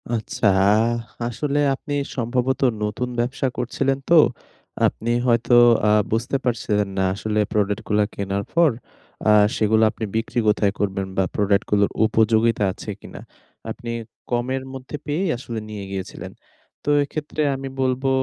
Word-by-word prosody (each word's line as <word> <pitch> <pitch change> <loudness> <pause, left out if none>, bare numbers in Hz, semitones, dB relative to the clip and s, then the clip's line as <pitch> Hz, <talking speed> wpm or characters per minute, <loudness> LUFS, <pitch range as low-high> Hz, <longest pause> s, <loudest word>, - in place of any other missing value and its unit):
আচ্ছা, 110 0 -1 0.8
আসলে 145 +4 -1 0.2
আপনি 145 - -7 0.2
সম্ভবত 125 +2 0 0.2
নতুন 105 +4 -2
ব্যবসা 130 +3 0
করছিলেন 135 +2 0
তো, 170 - +6 0.7
আপনি 115 - -4 0.2
হয়তো 120 0 +2 0.3
আ - - +4 0.2
বুঝতে 115 +5 0
পারছিলেন 105 -4 0
না - - +2
আসলে 105 +2 -2
প্রোডাক্ট 105 0 0
গুলা 105 0 +2
কেনার 100 0 -2
পর 170 -3 +4 0.6
আ - - +6 0.3
সেগুলো 110 +1 +3
আপনি 115 - -5
বিক্রি 115 +2 -1
কোথায় 105 -1 +3
করবেন? 95 -1 -1
বা 95 - +4
প্রোডাক্ট 100 -1 +2
গুলোর 100 -1 +3
উপযোগিতা 110 0 +2
আছে - - -9
কিনা? - - -10 0.5
আপনি 120 - -6 0.4
কমের 125 +2 -1
মধ্যে 130 +2 -7
পেয়েই 165 +5 -1
আসলে 120 -2 -5
নিয়ে 105 -2 -6
গিয়েছিলেন। 95 -1 -6 0.5
তো - - -2
এক্ষেত্রে 150 +2 -4
আমি 135 0 -6
বলবো 130 +1 0
115 Hz, 140 wpm, -22 LUFS, 105-130 Hz, 0.8 s, তো